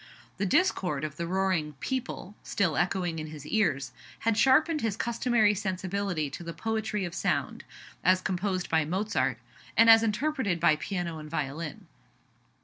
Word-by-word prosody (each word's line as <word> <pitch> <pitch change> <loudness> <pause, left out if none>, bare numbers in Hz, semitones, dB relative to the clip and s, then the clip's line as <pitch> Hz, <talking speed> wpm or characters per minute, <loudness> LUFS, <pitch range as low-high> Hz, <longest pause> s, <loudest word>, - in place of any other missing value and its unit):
The 200 - 0
discord 180 - +1
of 150 -1 -4
the 170 - -3
roaring 185 -4 0
"people" 240 - -4
(still 170 -6 0
echoing 175 -3 0
in 155 - -5
his 150 -2 -9
ears) 145 - 0 0.3
had 230 -1 +2
sharpened 300 +6 +4
his 220 -3 -1
customary 235 -2 +2
sensibility 190 -3 -2
to - - -7
the 170 0 -6
poetry 220 -2 -2
of 175 - -6
sound, 165 -7 -1 0.4
as 185 0 +5
composed 185 0 -2
by 160 -1 +2
Mozart, 190 +7 0 0.4
and 230 0 +8
as 225 0 +8
interpreted 225 - 0
by 160 -2 +5
piano 170 -1 -4
and 155 0 -9
violin. 150 0 -4
185 Hz, 150 wpm, -28 LUFS, 160-220 Hz, 0.4 s, and